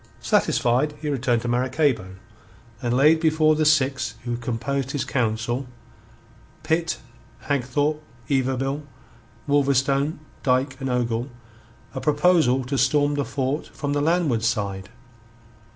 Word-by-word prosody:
Satisfied, 130 +5 +2
he 150 0 -3
returned 125 -4 0
to - - -3
Maracaybo, 125 -5 0 0.7
and 120 0 0
laid 155 +4 +5
before 155 -1 +3
the 155 0 +1
six 130 -6 +2
who 120 -1 -2
composed 125 +3 -3
his 140 -2 -1
council 120 0 -1 1.0
Pitt, 165 +1 0 0.4
Hagthorpe, 145 +3 0 0.3
Yberville, 135 +1 0 0.7
Wolverstone, 140 +1 +2 0.2
Dyke, 130 +1 +1
and 135 - -2
Ogle 120 0 -1 0.6
a - - -4
proposal 150 -4 +3
to 135 +2 -2
storm 145 +2 +3
the 145 -1 0
fort 140 +2 -2
from 145 -1 -4
the 145 - 0
landward 155 -7 +1
side. 100 -4 -2
135 Hz, 120 wpm, -23 LUFS, 125-145 Hz, 1.0 s, laid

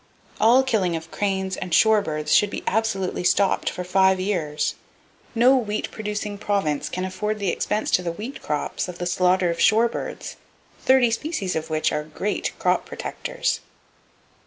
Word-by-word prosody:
All 235 +5 +5
killing 205 -10 +1
of 165 0 -7
cranes 190 -2 -1
and 180 - -6
shore 220 -1 +5
birds 155 -5 -2
should 205 - +5
be - - -6
absolutely 205 -5 -1
stopped, 195 +2 +2
for 180 - -5
five 190 +1 +3
years. 165 -6 -1 0.6
No 250 +4 +5
wheat 215 -5 -2
producing 210 -1 -4
province 195 -9 -1
can 185 0 -3
afford 210 +3 -2
the 200 -3 -1
expense 210 +4 -1
to - - +3
the 175 -1 -2
wheat 220 +11 -7
crops 150 +4 -2
of 180 -1 -7
the 175 - -4
slaughter 180 0 +2
of 170 - -5
shore 225 +2 +5
birds, - - -6 0.5
thirty 260 -3 +4
species 230 - -2
of 160 0 -3
which 155 0 +1
are 150 - -1
great 155 +7 -3
crop - - +1
protectors. - - -3
195 Hz, 165 wpm, -23 LUFS, 180-220 Hz, 0.6 s, All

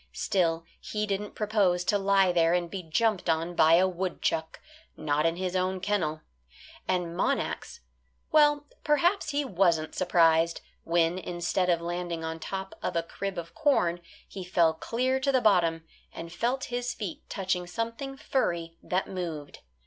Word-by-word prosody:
Still, 165 -3 0
he 210 0 -3
didn't 205 0 -3
propose 200 -5 +1
to 205 +2 +1
lie 195 -1 +4
there 170 -1 +3
and 175 -1 -2
be 195 - -4
jumped 185 +3 0
on 165 +2 0
by 160 -1 +5
a 185 +2 +4
woodchuck 175 -3 -2 0.4
not 150 +1 +1
in 165 - 0
his 185 0 -3
own 185 0 0
kennel. 180 -6 -1 0.7
And 175 -2 -1
Monax 470 - -2 0.5
well, 295 -1 +4 0.2
perhaps 340 +4 +2
he 285 0 0
wasn't 170 -8 +1
surprised 165 -2 +3 0.2
when, 170 +1 +2
instead 180 +1 -1
of 170 -1 +2
landing 175 -1 -3
on 160 0 -4
top 190 +2 -5
of - - -3
a 170 - +1
crib 195 +3 -5
of 165 -1 -6
corn 175 - +1 0.3
he 190 - -7
fell 175 -3 +3
clear 255 +10 -1
to 275 +1 +1
the 260 - +3
bottom, 170 -7 +3 0.3
and 165 +1 -8
felt 245 +7 -1
his 245 0 -2
feet 195 -7 -5
touching 185 -2 -2
something 230 +8 -4
furry 170 -13 -2
that 185 +2 -1
moved. 165 -6 -5
180 Hz, 155 wpm, -28 LUFS, 170-210 Hz, 0.7 s, by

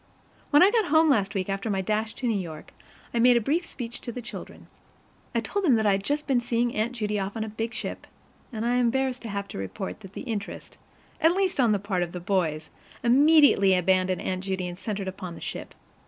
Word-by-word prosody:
When 290 +3 +7
I 390 - +6
got 450 -2 +2
home 315 -1 +4
last 205 -5 +1
week, 185 -1 -1
after 195 +2 -2
my 195 -2 0
dash 215 +3 -1
to 250 - -3
New 220 -4 +1
York, 160 -4 -8 0.4
I 235 - +1
made 245 +1 +6
a - - +4
brief 315 +9 0
speech 240 -2 -7
to 240 - -5
the 245 - -6
children. 240 +1 -9 0.7
I - - +2
told 405 - -2
them 285 -9 +5
that 220 -1 +1
I 205 - +5
had 195 0 0
just 295 +6 -1
been 265 -3 +2
seeing 240 0 0
Aunt 220 +3 -1
Judy 210 -3 -2
off 195 +2 -4
on 220 - -1
a - - -5
big 225 +2 -4
ship, - - -5 0.4
and 225 -1 -3
I 240 - +2
am 245 0 +3
embarrassed 260 +1 0
to 230 - -7
have 200 0 -3
to - - -6
report 95 - -5
that 195 -3 -12
the - - -6
interest 220 -6 -6 0.4
at 325 +2 +5
least 380 -5 0
on 240 -4 +4
the 205 - +3
part 195 -2 -2
of 175 -1 -3
the 180 - -4
boys 170 -4 -1 0.3
immediately 270 -6 +6
abandoned 185 0 +1
Aunt 185 0 -2
Judy 190 -2 -2
and 175 - -6
centered 200 0 -4
upon 185 -2 -6
the - - -10
ship. - - -7
220 Hz, 240 wpm, -26 LUFS, 190-250 Hz, 0.7 s, When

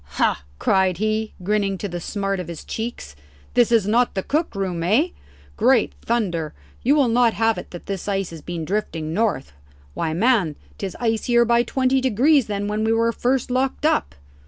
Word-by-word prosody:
"Ha!" - - +1
cried 190 - +2
he, 215 +2 -1
grinning 200 0 0
to 205 - -4
the 175 -2 -5
smart 195 +1 -2
of 180 - -5
his 170 -2 -7
cheeks, 220 - -5 0.4
"this 240 -1 +3
is 225 -4 +4
not 235 +2 +2
the 190 - -1
cook 310 -3 -1
room, 185 -4 -2
eh? 220 - +2 0.5
Great 240 +1 +3
thunder, 175 -10 -1 0.3
you 275 +5 +3
will 285 -4 +4
not 235 0 +3
have 225 0 +1
it - - -10
that 175 - -10
this 195 -1 -5
ice 195 -3 -1
has 165 -2 -9
been 170 0 -5
drifting 165 -5 -2
north? 205 - -1 0.4
Why, 160 -2 -2
man, 195 - +2 0.2
'tis 195 -2 -5
icier 235 +1 +2
by 235 0 +4
twenty 260 +2 +1
degrees 260 +2 +3
than 205 -1 -2
when 210 +1 -1
we 220 - +2
were 230 +1 +2
first 250 +2 0
locked 260 +3 0
up." 310 - +1
215 Hz, 185 wpm, -22 LUFS, 190-240 Hz, 0.5 s, is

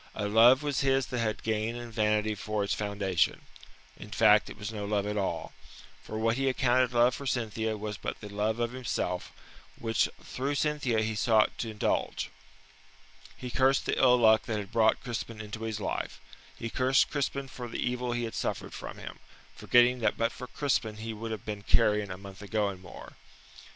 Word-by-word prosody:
A 105 - -2
love 120 +6 +6
was 145 -4 0
his 135 -1 +2
that 125 -2 -3
had 110 -2 -1
gain 110 +1 -1
and 120 -1 -7
vanity 105 0 +1
for 105 0 -2
its 100 - 0
foundation 100 -5 0 0.5
in 105 - -11
fact, 105 0 +5
it - - -10
was 105 +1 -5
no 105 -1 -4
love 100 0 0
at 105 0 -2
all. 95 -5 -2 0.5
For 110 - -6
what 115 +2 +1
he 135 0 +2
accounted 130 -1 +2
love 120 +1 +4
for 140 - -6
Cynthia 110 -3 -1
was 105 0 -5
but - - -5
the 105 - -8
love 105 +2 -1
of 120 0 0
himself, 125 -1 -3 0.5
which 115 -3 +1
through 140 +3 -3
Cynthia 140 -6 +1
he 110 0 -1
sought 110 0 +3
to 115 - -2
indulge. 105 -1 -1 1.1
He 125 -1 -6
cursed 135 +2 +3
the - - 0
ill 125 -1 +6
luck 110 -1 +5
that 110 -3 -1
had 100 -1 -6
brought 110 -1 +3
Crispin 115 -2 -5
into 110 +1 -7
his 110 -1 -3
life. 100 - -3 0.4
He 115 - -5
cursed 130 +1 +3
Crispin 140 -1 -2
for 125 -2 -7
the 115 - -5
evil 125 0 -1
he 120 0 -1
had 115 - -4
suffered - - -3
from - - -7
him, - - -9 0.4
forgetting 125 +1 +4
that 110 - +1
but 115 0 +1
for 125 - -8
Crispin 120 -6 -1
he 110 +1 -5
would 115 +1 -6
have 110 -3 -5
been 105 -1 -4
carrion 105 0 +2
a 90 - -5
month 100 0 -11
ago 105 0 0
and 95 -2 -8
more. 90 - -12
110 Hz, 195 wpm, -29 LUFS, 105-125 Hz, 1.1 s, love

